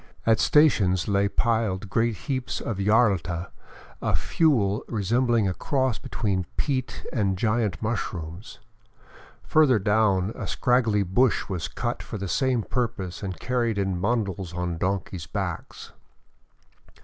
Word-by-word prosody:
At 110 Hz, -1 st, +4 dB
stations 100 Hz, -, +4 dB
lay 100 Hz, 0 st, +2 dB
piled 110 Hz, -4 st, 0 dB
great 115 Hz, +3 st, +1 dB
heaps 130 Hz, -4 st, -2 dB
of 110 Hz, -4 st, -4 dB
yarlta, 95 Hz, -5 st, +2 dB, 0.5 s
a -, -, 0 dB
fuel 115 Hz, -11 st, +2 dB
resembling 115 Hz, +1 st, +1 dB
a 95 Hz, -, 0 dB
cross 130 Hz, -, 0 dB
between 95 Hz, -5 st, -2 dB
peat 130 Hz, -3 st, -2 dB
and 100 Hz, -5 st, +1 dB
giant 110 Hz, 0 st, 0 dB
mushrooms. 95 Hz, -4 st, -4 dB, 0.9 s
Further 150 Hz, -6 st, +4 dB
down, 100 Hz, -1 st, +2 dB
a -, -, -6 dB
scraggly 115 Hz, -5 st, +2 dB
bush 105 Hz, +7 st, +2 dB
was 90 Hz, -4 st, -2 dB
cut -, -, -3 dB
for -, -, -6 dB
the 100 Hz, 0 st, -4 dB
same 125 Hz, +2 st, +1 dB
purpose 100 Hz, -8 st, -3 dB
and 95 Hz, -3 st, -5 dB
car 125 Hz, +1 st, -1 dB
ried 115 Hz, -3 st, 0 dB
in 95 Hz, -3 st, -1 dB
bundles 95 Hz, -5 st, -1 dB
on 90 Hz, -2 st, -3 dB
donkeys' 95 Hz, -4 st, -2 dB
backs. -, -, -5 dB
105 Hz, 130 wpm, -25 LUFS, 95-120 Hz, 0.9 s, At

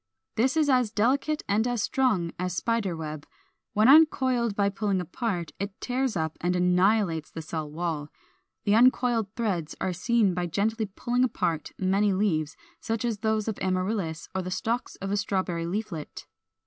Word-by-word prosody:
This 255 Hz, +7 st, +2 dB
is 310 Hz, -2 st, +3 dB
as 250 Hz, -5 st, +3 dB
delicate 265 Hz, +8 st, +1 dB
and 215 Hz, +4 st, +2 dB
as 240 Hz, -4 st, 0 dB
strong 215 Hz, -11 st, +1 dB
as 180 Hz, 0 st, -2 dB
spider 200 Hz, -2 st, -1 dB
web: 155 Hz, -2 st, -6 dB, 0.5 s
when 215 Hz, +2 st, +4 dB
uncoiled 260 Hz, -6 st, +5 dB
by 200 Hz, -1 st, +2 dB
pulling 200 Hz, -1 st, -1 dB
apart, 180 Hz, -2 st, -3 dB
it 200 Hz, +1 st, -5 dB
tears 255 Hz, -2 st, -1 dB
up 160 Hz, -1 st, -3 dB
and 180 Hz, +1 st, +1 dB
annihilates 180 Hz, -2 st, +2 dB
the 160 Hz, -, -7 dB
cell 155 Hz, -1 st, -4 dB
wall. 155 Hz, -2 st, -3 dB, 0.5 s
The 205 Hz, -, +2 dB
uncoiled 240 Hz, -1 st, +4 dB
threads 190 Hz, -10 st, -2 dB
are 185 Hz, -, -1 dB
seen 210 Hz, +1 st, +2 dB
by 175 Hz, 0 st, -2 dB
gently 215 Hz, +6 st, 0 dB
pulling 240 Hz, +5 st, -1 dB
apart 165 Hz, -10 st, -1 dB
many 195 Hz, +2 st, +2 dB
leaves, 165 Hz, -6 st, 0 dB, 0.2 s
such 225 Hz, +1 st, -2 dB
as 225 Hz, -3 st, -1 dB
those 220 Hz, 0 st, 0 dB
of 220 Hz, -, -3 dB
Amaryllis, 185 Hz, -3 st, -1 dB
or 190 Hz, -, -1 dB
the 185 Hz, -, -5 dB
stalk 230 Hz, +6 st, -1 dB
of 195 Hz, -, -2 dB
a 205 Hz, -, +1 dB
Strawberry 185 Hz, -4 st, -1 dB
leaflet. 180 Hz, -5 st, -5 dB
200 Hz, 165 wpm, -27 LUFS, 175-230 Hz, 0.5 s, uncoiled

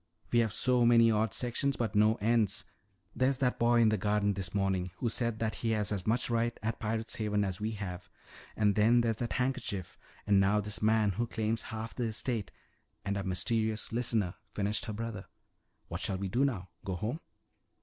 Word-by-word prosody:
We 120 Hz, -, +4 dB
have 115 Hz, -2 st, +2 dB
so 125 Hz, +3 st, +2 dB
many 115 Hz, -1 st, +6 dB
odd 110 Hz, -1 st, +1 dB
sections 125 Hz, +5 st, 0 dB
but 115 Hz, -3 st, -1 dB
no 110 Hz, +1 st, +4 dB
ends. 110 Hz, -1 st, +1 dB, 0.5 s
There's 130 Hz, +1 st, +2 dB
that 125 Hz, -2 st, 0 dB
boy 120 Hz, 0 st, +4 dB
in 110 Hz, -, +5 dB
the 110 Hz, -2 st, +1 dB
garden 105 Hz, +1 st, +1 dB
this 95 Hz, -2 st, -4 dB
morning 95 Hz, -2 st, 0 dB
who 120 Hz, -, -1 dB
said 115 Hz, -1 st, -1 dB
that 110 Hz, -1 st, -1 dB
he 115 Hz, -1 st, +1 dB
has 105 Hz, 0 st, -1 dB
as 100 Hz, -2 st, -3 dB
much 115 Hz, +3 st, +1 dB
right 120 Hz, 0 st, 0 dB
at 110 Hz, +1 st, -2 dB
Pirate's 110 Hz, +1 st, -2 dB
Haven 105 Hz, -2 st, 0 dB
as 95 Hz, 0 st, -3 dB
we 110 Hz, +1 st, -1 dB
have, 95 Hz, -4 st, -6 dB, 0.5 s
and 105 Hz, -2 st, +3 dB
then 115 Hz, +4 st, +4 dB
there's 115 Hz, -2 st, 0 dB
that 120 Hz, 0 st, -2 dB
handkerchief, 125 Hz, -8 st, -2 dB, 0.3 s
and 100 Hz, -1 st, +4 dB
now 100 Hz, +2 st, +3 dB
this 105 Hz, 0 st, -2 dB
man 110 Hz, -1 st, +3 dB
who 115 Hz, +5 st, -2 dB
claims 110 Hz, 0 st, -1 dB
half 110 Hz, +1 st, -6 dB
the 125 Hz, -, -2 dB
estate 115 Hz, -1 st, -2 dB, 0.3 s
" -, -, -44 dB
"And 100 Hz, 0 st, -1 dB
our 100 Hz, -, -1 dB
mysterious 110 Hz, +4 st, -1 dB
listener," 115 Hz, -6 st, 0 dB, 0.2 s
finished 105 Hz, +1 st, -1 dB
her 110 Hz, -, -4 dB
brother. 105 Hz, -2 st, -5 dB, 0.6 s
"What -, -, -5 dB
shall 95 Hz, -, -1 dB
we 95 Hz, 0 st, -3 dB
do 125 Hz, +7 st, +2 dB
now? 95 Hz, -10 st, -2 dB
Go 95 Hz, -, -3 dB
home?" 110 Hz, -, -3 dB
110 Hz, 200 wpm, -31 LUFS, 100-115 Hz, 0.6 s, many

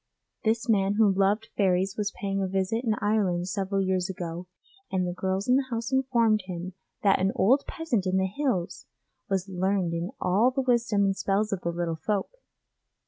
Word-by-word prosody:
This 225 Hz, +2 st, +1 dB
man 200 Hz, -3 st, +2 dB
who 210 Hz, -2 st, +4 dB
loved 200 Hz, +3 st, +1 dB
fairies 190 Hz, -1 st, +2 dB
was 205 Hz, -1 st, -1 dB
paying 195 Hz, -1 st, -1 dB
a 190 Hz, -, 0 dB
visit 195 Hz, +5 st, -1 dB
in 220 Hz, -3 st, +1 dB
Ireland 195 Hz, -4 st, +1 dB
several 195 Hz, +1 st, -1 dB
years 185 Hz, 0 st, 0 dB
ago 175 Hz, -1 st, -5 dB, 0.4 s
and 185 Hz, -1 st, +1 dB
the 175 Hz, -, -3 dB
girls 190 Hz, +2 st, -2 dB
in 250 Hz, +1 st, +5 dB
the 270 Hz, -1 st, -1 dB
house 230 Hz, 0 st, -3 dB
informed 235 Hz, -5 st, +2 dB
him 180 Hz, 0 st, -5 dB, 0.3 s
that 195 Hz, -2 st, +4 dB
an 190 Hz, +1 st, +2 dB
old 255 Hz, +9 st, +3 dB
peasant 240 Hz, -, -1 dB
in 185 Hz, 0 st, +1 dB
the 190 Hz, -, +2 dB
hills 195 Hz, -4 st, -2 dB, 0.4 s
was 190 Hz, -1 st, 0 dB
learned 190 Hz, -1 st, 0 dB
in 170 Hz, +2 st, -2 dB
all 200 Hz, +7 st, +3 dB
the 265 Hz, +1 st, -1 dB
wisdom 235 Hz, -5 st, +2 dB
and 195 Hz, 0 st, +1 dB
spells 200 Hz, +2 st, 0 dB
of 190 Hz, -, -3 dB
the 170 Hz, -, -2 dB
little 170 Hz, -1 st, -2 dB
folk. 205 Hz, -3 st, -1 dB
195 Hz, 190 wpm, -27 LUFS, 185-220 Hz, 0.4 s, in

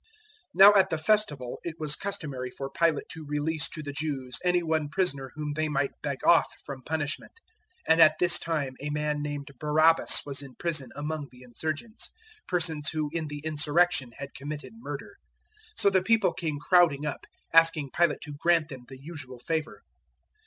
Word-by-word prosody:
015:006 -, -, -29 dB, 0.5 s
Now 200 Hz, +2 st, +9 dB
at 190 Hz, -2 st, +4 dB
the 160 Hz, -, -1 dB
Festival 155 Hz, -, 0 dB
it 170 Hz, -2 st, -5 dB
was 155 Hz, -2 st, 0 dB
customary 140 Hz, -10 st, -4 dB
for 135 Hz, +2 st, -7 dB
Pilate 165 Hz, -4 st, +1 dB
to 160 Hz, -, -7 dB
release 150 Hz, +1 st, 0 dB
to 155 Hz, -, -6 dB
the 145 Hz, -1 st, -6 dB
Jews 140 Hz, -4 st, -2 dB
any 180 Hz, -1 st, +2 dB
one 160 Hz, -2 st, 0 dB
prisoner 140 Hz, -7 st, -1 dB
whom 150 Hz, -1 st, -4 dB
they 155 Hz, +1 st, -1 dB
might 140 Hz, -2 st, 0 dB
beg 140 Hz, -2 st, -4 dB
off 170 Hz, -, +6 dB, 0.2 s
from 135 Hz, -2 st, -7 dB
punishment; 150 Hz, +1 st, -3 dB, 0.5 s
015:007 -, -, -32 dB
and 165 Hz, -, +3 dB
at 155 Hz, -1 st, +7 dB
this 175 Hz, -1 st, +4 dB
time 150 Hz, -5 st, -2 dB
a 150 Hz, -, -3 dB
man 150 Hz, 0 st, -1 dB
named 145 Hz, -1 st, -5 dB
Barabbas 155 Hz, +2 st, +4 dB
was 140 Hz, -1 st, -3 dB
in 135 Hz, -3 st, -11 dB
prison 155 Hz, -6 st, -1 dB
among 150 Hz, 0 st, -4 dB
the 125 Hz, 0 st, -16 dB
insurgents 155 Hz, -, -4 dB, 0.4 s
persons 160 Hz, -3 st, +1 dB
who 155 Hz, -2 st, -2 dB
in 165 Hz, -2 st, -2 dB
the 145 Hz, 0 st, -7 dB
insurrection 155 Hz, -3 st, +2 dB
had 140 Hz, 0 st, -8 dB
committed 145 Hz, +6 st, -7 dB
murder. 230 Hz, +2 st, -8 dB, 0.6 s
015:008 -, -, -4 dB
So 200 Hz, -, +6 dB
the 190 Hz, -1 st, +3 dB
people 210 Hz, -2 st, +3 dB
came 155 Hz, -4 st, -3 dB
crowding 160 Hz, -4 st, +3 dB
up, 145 Hz, -2 st, -5 dB, 0.3 s
asking 165 Hz, -4 st, +4 dB
Pilate 170 Hz, -3 st, +2 dB
to 145 Hz, -1 st, -7 dB
grant 170 Hz, -2 st, +2 dB
them 130 Hz, -3 st, -9 dB
the 135 Hz, -, -10 dB
usual 135 Hz, -4 st, -8 dB
favour. 160 Hz, +5 st, -3 dB
150 Hz, 185 wpm, -27 LUFS, 145-165 Hz, 0.6 s, Now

